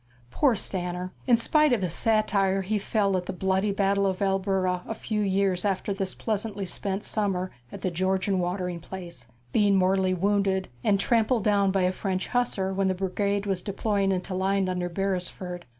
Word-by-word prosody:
Poor 265 - +3
Stanner! 180 -2 -3
In 240 -2 +6
spite 305 +5 +3
of 225 -6 +2
his 175 -3 -1
satire, 200 -2 +2
he 210 +3 0
fell 200 -1 +1
at 180 -1 -4
the - - -2
bloody 190 +2 0
battle 200 0 +2
of 190 -1 -1
Albuera 190 -2 0
a 225 - -3
few 215 -1 -2
years 195 -2 +1
after 200 0 0
this 195 -1 -3
pleasantly 210 -2 -2
spent 195 +2 -2
summer 190 -4 -1 0.2
at - - -8
the 185 - -1
Georgian 185 +2 0
watering 180 -1 -2
place, 170 -7 -8 0.3
being 205 -2 +4
mortally 185 0 +2
wounded 195 0 +1
and 200 -1 +3
trampled 230 +2 +2
down 200 -2 +3
by 190 -1 +1
a 180 - +3
French 185 0 -3
hussar 210 -6 0
when 195 0 +1
the 185 - +1
brigade 200 +2 -1
was 190 -3 -1
deploying 200 0 0
into 185 0 -2
line 190 +1 +1
under 180 -1 -2
Beresford. 180 -2 -3
195 Hz, 180 wpm, -26 LUFS, 185-205 Hz, 0.3 s, In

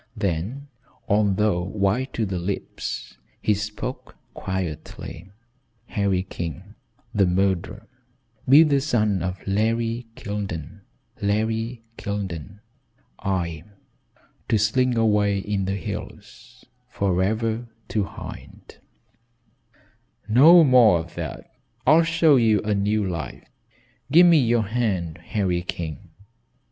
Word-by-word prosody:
Then 105 - -2 0.4
although 105 -2 +2
white 105 +7 -1
to 115 - -1
the 95 -3 -3
lips, 95 +3 -5 0.2
he 105 - +2
spoke 105 +1 -5 0.2
quietly: 90 0 -5 0.6
"Harry 100 -3 0
King 85 -5 -7 0.4
the 100 -3 +3
murderer 95 +3 0 0.6
be 145 +4 +9
the 140 -3 +2
son 110 - +1
of 90 +2 -2
Larry 115 +3 0
Kildene 100 - -5 0.4
Larry 110 +3 -1 0.2
Kildene 100 -1 -5 0.6
I 85 -5 -2 0.9
to 110 - +3
slink 120 +4 +2
away 105 -3 +2
in 100 0 -2
the 95 +1 -1
hills 115 +6 -8 0.2
forever 110 +4 0 0.2
to 105 - 0
hide - - -11 0.8
" - - -46 0.7
"No 155 +10 +8
more 125 - +6
of 85 +1 -6
that. - - -6 0.4
I'll 155 +3 +6
show 165 -3 +4
you 110 -3 +4
a 105 0 0
new 105 0 +1
life. 85 -8 -6 0.6
Give 175 +4 +8
me 170 -3 +6
your 120 -3 +2
hand, 95 -7 -2
Harry 90 -1 -1
King." 85 -3 -6
105 Hz, 110 wpm, -24 LUFS, 95-115 Hz, 0.9 s, be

